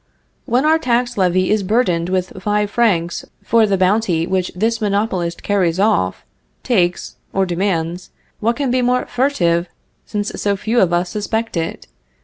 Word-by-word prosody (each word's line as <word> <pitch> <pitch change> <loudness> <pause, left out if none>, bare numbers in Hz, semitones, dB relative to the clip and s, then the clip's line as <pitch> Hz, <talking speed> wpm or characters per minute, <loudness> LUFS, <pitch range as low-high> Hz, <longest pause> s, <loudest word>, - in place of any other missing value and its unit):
When 250 +5 +1
our 320 +1 +4
tax 245 -2 0
levy 185 -1 +2
is 215 -1 +2
burdened 185 -5 +1
with 185 0 -2
five 210 0 0
francs 180 -8 +1 0.2
for 225 -1 +3
the 195 -1 +1
bounty 185 -3 +2
which 185 0 -1
this 225 +4 0
monopolist 200 -4 -1
carries 185 -4 +1
off, 95 - +1 0.4
takes, 180 -8 0 0.2
or 195 0 +2
demands, 175 -1 -2 0.3
what 230 +2 +1
can 275 -2 -1
be 255 0 +2
more 250 +1 +1
furtive, 180 -11 +1 0.4
since 205 -1 -2
so 200 -1 +1
few 225 +5 0
of 180 - +3
us 175 +1 +1
suspect 220 +1 -2
it? 165 -1 -3
200 Hz, 155 wpm, -18 LUFS, 180-230 Hz, 0.4 s, our